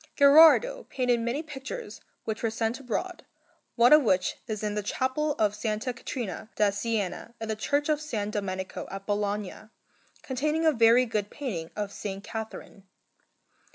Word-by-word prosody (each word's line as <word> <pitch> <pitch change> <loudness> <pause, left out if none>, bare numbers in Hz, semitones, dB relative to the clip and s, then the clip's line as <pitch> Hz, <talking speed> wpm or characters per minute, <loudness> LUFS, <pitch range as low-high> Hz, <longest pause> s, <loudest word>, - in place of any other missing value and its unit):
Gherardo 320 - +6
painted 250 -2 +1
many 235 +7 -2
pictures 310 - -7 0.2
which 220 -1 -3
were 230 - +1
sent 225 +2 -2
abroad, 275 - -4 0.5
one 240 +3 +6
of 300 - +8
which 185 -7 +1
is 215 -2 -4
in 210 -1 -1
the 210 - -1
Chapel 260 +8 -1
of 215 -6 +1
S. 215 +1 -3
Caterina 230 -5 -5
da 210 -1 +3
Siena 215 +1 -3
in 225 - -5
the 220 - 0
Church 285 +7 0
of 305 -2 +1
S. 220 -9 -3
Domenico 190 -2 -4
at 195 0 -7
Bologna, 205 0 -3 0.5
containing 300 +5 -1
a 315 - +6
very 235 -1 +5
good 210 -3 -2
painting 195 - -5
of 205 -1 -3
S. - - -10 0.2
Catherine. 220 -3 -8
230 Hz, 155 wpm, -27 LUFS, 210-280 Hz, 0.5 s, of